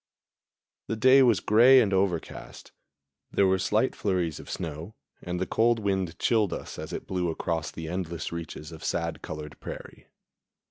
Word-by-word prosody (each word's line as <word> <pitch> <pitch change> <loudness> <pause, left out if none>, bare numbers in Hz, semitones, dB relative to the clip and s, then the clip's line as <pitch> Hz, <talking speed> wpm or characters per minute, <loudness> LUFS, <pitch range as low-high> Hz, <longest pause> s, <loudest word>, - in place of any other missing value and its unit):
The 115 - -2
day 130 +4 +6
was 120 -5 +4
gray 120 +5 +6
and 105 -5 +2
overcast. 95 -4 -2 0.6
There 100 - +3
were 95 0 +2
slight 105 +6 +1
flurries 90 -6 -1
of - - -11
snow, 85 +4 -6 0.3
and 90 0 -4
the 95 - 0
cold 115 +3 +2
wind 95 -5 -1
chilled 110 -5 +2
us - - -7
as - - -6
it - - -5
blew 90 -2 -1
across 80 -1 -2
the 80 -1 -7
endless 85 -1 -4
reaches 85 -1 -7
of 80 -1 -10
sad 85 -1 -2
colored 75 -1 -8
prairie. - - -9
95 Hz, 160 wpm, -27 LUFS, 85-110 Hz, 0.6 s, day